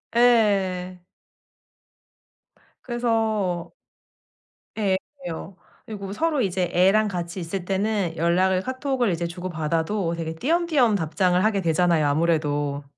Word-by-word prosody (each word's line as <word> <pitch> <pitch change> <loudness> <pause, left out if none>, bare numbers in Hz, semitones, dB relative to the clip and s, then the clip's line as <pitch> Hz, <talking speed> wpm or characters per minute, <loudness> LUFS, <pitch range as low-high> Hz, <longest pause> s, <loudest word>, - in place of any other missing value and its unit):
예. 195 -7 +2 1.8
그래서 220 -7 -1 1.1
예 195 -3 +1 0.3
애매해요. 175 +3 -6 0.3
그리고 200 -3 -7
서로 300 +6 0
이제 185 -4 0
애랑 195 +4 +4
같이 175 -2 -4
있을 175 +2 -4
때는 195 -3 -1
연락을 185 +3 +2
카톡을 260 -1 -1
이제 170 0 -2
주고받아도 170 +1 -2
되게 160 -1 -4
띄엄띄엄 295 - +2
답장을 180 +1 +1
하게 215 -2 +2
되잖아요 165 -2 +2
아무래도. 145 -2 0
185 Hz, 260 characters per minute, -24 LUFS, 170-215 Hz, 1.8 s, 애랑